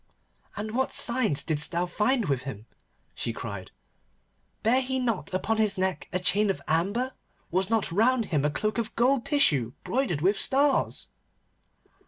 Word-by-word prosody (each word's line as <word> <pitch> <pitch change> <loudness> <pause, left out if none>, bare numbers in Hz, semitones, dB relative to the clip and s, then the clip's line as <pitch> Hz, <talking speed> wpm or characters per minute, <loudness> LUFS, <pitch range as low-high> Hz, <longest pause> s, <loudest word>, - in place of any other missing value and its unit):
'And 215 +1 -4
what 260 +3 0
signs 230 - +1
didst 150 -1 0
thou 175 +1 0
find 215 +7 +1
with 135 -5 0
him?' 120 -5 -8 0.5
she 115 - -2
cried. 100 -5 -7 0.9
'Bare 245 +4 +4
he 260 0 -2
not 235 -6 -2
upon 205 +4 -1
his 215 -2 +2
neck 185 -4 -1
a 180 - 0
chain 200 +3 +2
of 195 - -1
amber? 200 +11 0 0.4
Was 185 +3 +1
not 225 -6 0
round 230 +5 +2
him 145 -2 +2
a 150 - +2
cloak 215 +10 -1
of 225 -1 -4
gold 255 +1 +2
tissue 145 - +2
broidered 240 - -1
with 195 +4 +2
stars? 275 +1 +1
205 Hz, 160 wpm, -27 LUFS, 160-245 Hz, 0.9 s, Bare